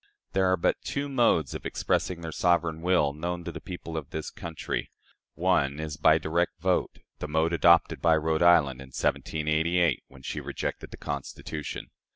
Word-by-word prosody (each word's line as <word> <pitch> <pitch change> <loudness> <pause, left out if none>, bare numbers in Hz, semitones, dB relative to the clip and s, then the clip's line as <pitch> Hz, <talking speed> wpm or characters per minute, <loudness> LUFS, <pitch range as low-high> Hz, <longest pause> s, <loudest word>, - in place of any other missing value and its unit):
There 95 -1 +3
are 95 0 +3
but - - +1
two 140 +1 -3
modes 120 - +2
of - - -6
expressing 90 -2 -1
their 80 -1 -5
sovereign 85 -2 +1
will 85 -5 +2
known 85 +3 -4
to - - -5
the - - -8
people 85 -2 -7
of 75 -4 -4
this 80 - -5
country. 85 -7 -4 0.5
One 85 -6 +1
is 80 -1 -4
by 80 0 +5
direct 80 +2 -1
vote 90 +2 0 0.2
the - - -4
mode 80 +2 +1
adopted 85 0 +4
by 80 -1 +4
Rhode 80 +1 0
Island 75 -7 +5
in 65 - -10
1788, 80 +4 +1
when 65 0 -16
she - - -4
rejected - - -4
the - - -10
Constitution. 75 -1 -5
80 Hz, 175 wpm, -28 LUFS, 75-90 Hz, 0.5 s, by